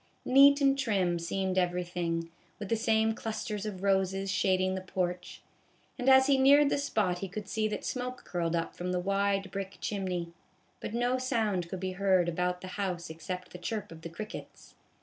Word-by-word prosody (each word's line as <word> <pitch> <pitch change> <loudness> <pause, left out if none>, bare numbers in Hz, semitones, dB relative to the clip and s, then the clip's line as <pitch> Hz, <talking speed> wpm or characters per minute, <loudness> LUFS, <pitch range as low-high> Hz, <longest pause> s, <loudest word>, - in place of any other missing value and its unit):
Neat 280 +2 +7
and 275 0 +3
trim 190 -9 +1
seemed 190 +2 -1
everything, 175 -2 -2 0.3
with 205 -2 -6
the 230 - +2
same 220 0 +2
clusters 215 -2 -4
of 195 -2 -6
roses 195 0 +1
shading 185 0 +2
the 190 - -3
porch; 180 -1 -4 0.5
and 255 0 +1
as 265 0 +7
he 275 -1 +3
neared 280 +2 +6
the - - +1
spot 205 -10 0
he 195 - -4
could 200 +2 -7
see 215 +2 0
that 215 - -4
smoke 250 0 -4
curled 170 -2 -1
up 165 - -2
from 180 +1 -3
the 180 - +1
wide 195 +1 0
brick 195 0 -5
chimney; 180 -4 -3 0.5
but 225 - -5
no 245 +2 +1
sound 215 -9 0
could 190 - -5
be 185 0 -3
heard 185 -2 +2
about 180 +1 -1
the 185 - -7
house 175 -4 -3
except 180 +3 -6
the 180 - -9
chirp 215 +1 -4
of 165 -1 -11
the 165 - -7
crickets. 210 +6 -9
190 Hz, 190 wpm, -30 LUFS, 180-220 Hz, 0.5 s, Neat